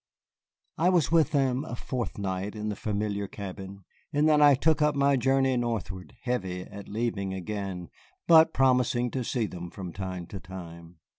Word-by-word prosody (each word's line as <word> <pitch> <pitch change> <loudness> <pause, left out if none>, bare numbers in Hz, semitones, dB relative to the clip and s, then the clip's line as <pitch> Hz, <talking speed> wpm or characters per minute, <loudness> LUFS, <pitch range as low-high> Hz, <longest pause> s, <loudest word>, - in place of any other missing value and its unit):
I 175 +3 +4
was 175 -5 +2
with 165 -2 +4
them 135 -3 +1
a 140 - -6
fortnight 100 -6 -4
in 105 0 -3
the 105 - -3
familiar 100 -1 -2
cabin, 95 0 -8 0.3
and 145 +1 +2
then 150 -1 +5
I 145 -1 +7
took 155 +3 +2
up 150 -1 +3
my 140 0 +3
journey 135 +1 +2
northward, 110 -6 -3
heavy 95 -8 -2
at 100 +1 -10
leaving 105 -3 -2
again, 95 -2 -5 0.3
but 160 -1 +7
promising 125 -2 +2
to 130 - -2
see 120 -1 -1
them 90 -3 -7
from 90 -2 -8
time 95 -2 -5
to 95 - -4
time. 85 -2 -10
110 Hz, 165 wpm, -28 LUFS, 95-135 Hz, 0.3 s, I